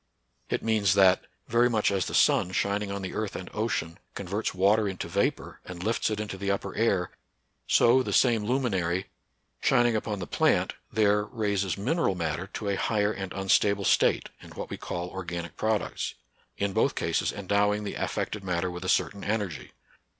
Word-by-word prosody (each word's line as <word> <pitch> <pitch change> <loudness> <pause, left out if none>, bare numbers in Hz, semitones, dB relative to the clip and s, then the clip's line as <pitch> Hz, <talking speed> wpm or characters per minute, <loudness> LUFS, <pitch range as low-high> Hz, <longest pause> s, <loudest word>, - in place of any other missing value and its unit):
It - - -1
means 105 -4 +2
that, 95 -2 +5 0.2
very 120 +2 +3
much 110 -4 +2
as 95 -3 0
the - - -3
sun, 90 - +3
shining 100 +1 0
on 100 0 -4
the 95 - -5
earth 110 -2 -3
and 90 - -7
ocean, 105 -6 -2 0.2
converts 100 +3 -2
water 100 +3 +3
into 95 -3 -4
vapor 100 +4 -1
and 90 -1 -8
lifts 115 +3 0
it 105 -1 -2
into 105 -3 -5
the 100 +1 -2
upper 100 - -2
air, 100 -5 +1 0.6
so 120 +3 +5
the - - -3
same 115 -4 +3
luminary, 95 -8 0 0.6
shining 120 -3 +3
upon 105 -1 -2
the 90 - -5
plant, - - +2 0.2
there 105 -1 +3
raises 100 -5 -1
mineral 105 - 0
matter 85 +1 -2
to 105 0 -5
a 100 - 0
higher 105 -1 +1
and 95 -3 -5
unstable 100 +1 +2
state, - - +3
in - - -12
what - - -6
we - - -2
call 85 0 -4
organic 85 -2 -6
products, 110 -1 -1 0.2
— - - -35
in 100 -1 -1
both - - +2
cases - - 0
endowing 100 +1 +1
the 100 - -4
affected 105 -2 -3
matter 90 -1 -1
with 90 +1 -7
a 95 - -2
certain 100 - +1
energy. 100 -7 -3
100 Hz, 180 wpm, -27 LUFS, 95-110 Hz, 0.6 s, that